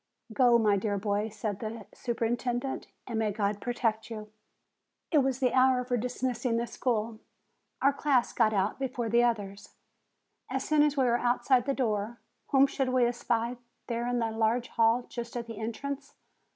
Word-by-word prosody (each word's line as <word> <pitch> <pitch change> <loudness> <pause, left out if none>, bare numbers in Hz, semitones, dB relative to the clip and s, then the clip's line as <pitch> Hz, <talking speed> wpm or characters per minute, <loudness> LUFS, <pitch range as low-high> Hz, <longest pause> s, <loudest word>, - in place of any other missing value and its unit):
"Go, 240 0 +5
my 210 -3 +3
dear 205 +1 -1
boy," 205 +2 -1
said 210 -1 -4
the 220 -1 -6
superintendent; 245 +2 -2 0.2
"and 230 -3 -3
may 215 -1 +1
God 205 0 -1
protect 225 -2 -1
you!" 215 -2 -7 0.8
It 310 - +5
was 265 -2 +1
the 255 -3 +2
hour 255 -1 +4
for 250 0 -1
dismissing 245 0 -1
the 235 - 0
school. 230 -2 -2 0.6
Our 280 +1 +5
class 275 -3 +1
got 225 -2 +3
out 205 +2 0
before 245 -3 -2
the 235 +2 +4
others. 205 -4 -2 0.7
As 265 +1 -2
soon 305 -1 +4
as 295 -1 +2
we 270 - +4
were 240 -1 +2
outside 245 +1 +2
the 275 - +1
door, 225 -2 -1 0.3
whom 270 0 +5
should 270 -1 -1
we 255 -1 +3
espy 240 0 -1 0.3
there 235 0 -2
in 245 0 0
the 230 -1 0
large 225 +2 0
hall 230 +1 +3
just 235 0 -6
at 235 - -4
the 230 -2 -8
entrance? 275 +5 -5
235 Hz, 175 wpm, -29 LUFS, 220-255 Hz, 0.8 s, Go